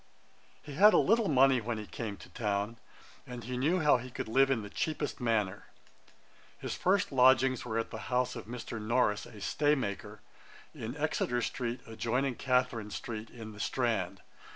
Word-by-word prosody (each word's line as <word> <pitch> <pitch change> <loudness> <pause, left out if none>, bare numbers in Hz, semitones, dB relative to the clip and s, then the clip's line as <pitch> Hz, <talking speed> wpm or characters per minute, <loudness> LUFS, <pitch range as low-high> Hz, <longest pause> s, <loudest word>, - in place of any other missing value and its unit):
He 145 - -9
had 205 +8 +7
a - - +7
little 225 +1 +3
money 135 -2 +5
when 115 +1 -3
he 105 - -6
came 105 -2 -5
to - - -13
town, 105 +1 -2 0.5
and 125 -2 -7
he 125 +3 -4
knew 160 +8 +1
how 150 -4 +5
he 125 +1 -8
could 120 - -5
live 135 +4 +4
in 125 -5 +1
the 105 - -8
cheapest 155 +1 -2
manner. 110 -5 0 0.9
His - - -4
first 190 +1 +1
lodgings 130 -1 +4
were 115 -2 -2
at 115 - -2
the - - -6
house 125 0 +1
of - - -8
Mr. 115 -1 -6
Norris, 110 -2 +1
a 105 - -12
staymaker, 105 -5 -1 0.5
in 115 +5 -6
Exeter 135 -5 0
street, 120 -1 -3
adjoining 120 +4 -1
Catharine 125 -4 0
street, 110 0 -6
in 110 -2 -9
the 105 - -12
Strand. 105 -6 -1
120 Hz, 175 wpm, -31 LUFS, 110-135 Hz, 0.9 s, had